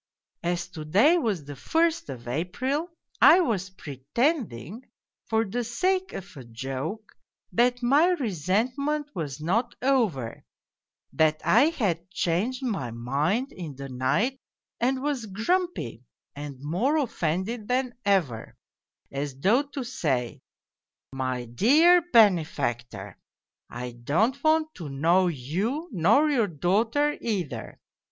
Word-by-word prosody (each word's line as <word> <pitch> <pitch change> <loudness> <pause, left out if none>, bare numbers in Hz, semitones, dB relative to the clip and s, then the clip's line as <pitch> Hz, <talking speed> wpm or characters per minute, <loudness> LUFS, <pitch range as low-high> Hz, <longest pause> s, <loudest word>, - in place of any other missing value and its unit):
As 175 0 -1
to 160 -4 -8
day 220 - +4
was 205 - -1
the 145 0 -8
first 330 - 0
of 120 -3 -8
April, 255 - -2 0.3
I 370 - +8
was 200 - -1
pretending, 190 - -2 0.4
for 225 0 +1
the 240 +5 -2
sake 370 +11 0
of 185 -2 -8
a 135 - -9
joke, 135 - -6 0.4
that 245 +1 +2
my 285 +7 +5
resentment 260 - -1
was 150 -4 -4
not 225 +10 0
over, 220 - 0 0.7
that 155 -1 +2
I 240 +6 +6
had 195 - -1
changed 190 +9 -1
my 200 - -2
mind 145 - -1
in 160 -6 -7
the 135 +1 -7
night 170 - 0 0.4
and 260 +2 0
was 275 -6 -2
grumpy, 225 - -1 0.3
and 145 -1 -7
more 185 - 0
offended 205 - -2
than 250 0 0
ever, 180 - 0 0.5
as 140 -1 -4
though 215 - +4
to 285 -2 -6
say, 135 - -2 0.4
' - - -31
My 130 -2 -2
dear 295 - +5
benefactor, 125 - +2 0.5
I 125 +1 -6
don't 170 - 0
want 315 0 +2
to 165 -6 -6
know 170 +7 +3
yon 185 - -2
nor 220 - +4
your 235 -7 +2
daughter 220 - +1
either. 195 - -4
195 Hz, 125 wpm, -26 LUFS, -, 0.7 s, I